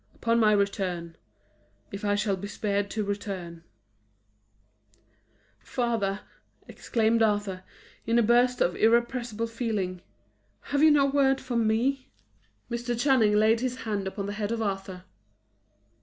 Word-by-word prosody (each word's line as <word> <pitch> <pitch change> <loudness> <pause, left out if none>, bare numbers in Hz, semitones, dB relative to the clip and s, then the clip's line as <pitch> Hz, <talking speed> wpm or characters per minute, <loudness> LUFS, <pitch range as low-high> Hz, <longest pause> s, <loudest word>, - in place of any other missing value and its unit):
Upon 230 0 +1
my 215 -2 +5
return 190 -5 -1 0.8
if 200 +2 -7
I 205 0 +1
shall 205 -1 0
be 195 +2 -7
spared 200 0 -2
to 215 +1 -2
return 195 -5 -5 1.0
" 105 0 -38 0.6
"Father," 225 -5 -2 0.5
exclaimed 230 0 0
Arthur, 205 -4 0 0.5
in 230 +1 +2
a 235 - +4
burst 245 +2 +3
of 175 - +2
irrepressible 235 0 +1
feeling, 215 -6 -3 0.7
"have 285 0 +2
you 315 - +7
no 290 -2 +5
word 270 -1 +2
for 255 -2 -5
me?" 235 +4 +1 0.6
Mr. 240 0 -3
Channing 245 -6 +3
laid 220 +2 +4
his 255 +1 -3
hand 205 -3 -2
upon 200 +1 -4
the 205 - -4
head 210 0 -3
of 230 - -1
Arthur. 195 -3 -4
215 Hz, 135 wpm, -27 LUFS, 200-235 Hz, 1.0 s, you